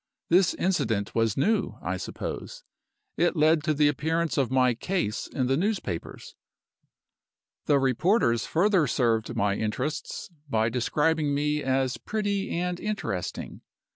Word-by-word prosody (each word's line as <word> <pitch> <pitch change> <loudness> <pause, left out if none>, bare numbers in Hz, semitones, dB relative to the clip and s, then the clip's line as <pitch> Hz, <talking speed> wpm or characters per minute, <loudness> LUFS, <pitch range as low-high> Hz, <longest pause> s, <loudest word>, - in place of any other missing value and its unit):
This 180 +1 +4
incident 115 - 0
was 115 -3 +1
new, 215 +11 +1
I - - -3
suppose; - - -6 0.5
it 175 +1 +2
led 155 0 +3
to 155 - +2
the 150 0 +4
appearance 160 +3 0
of 135 -4 +1
my 130 -1 +3
'case' 125 - -2
in 130 - -2
the 135 +2 +2
newspapers. 175 - -3 1.3
The 145 - +5
reporters 135 - +2
further 180 -2 +3
served 115 -2 0
my 105 -3 +1
interests 125 - -3 0.2
by 110 -2 +2
describing 145 +5 +1
me 150 +1 0
as 130 -1 0
'pretty 205 -2 -2
and 180 +1 -2
interesting. 205 - -4
145 Hz, 130 wpm, -27 LUFS, 120-175 Hz, 1.3 s, The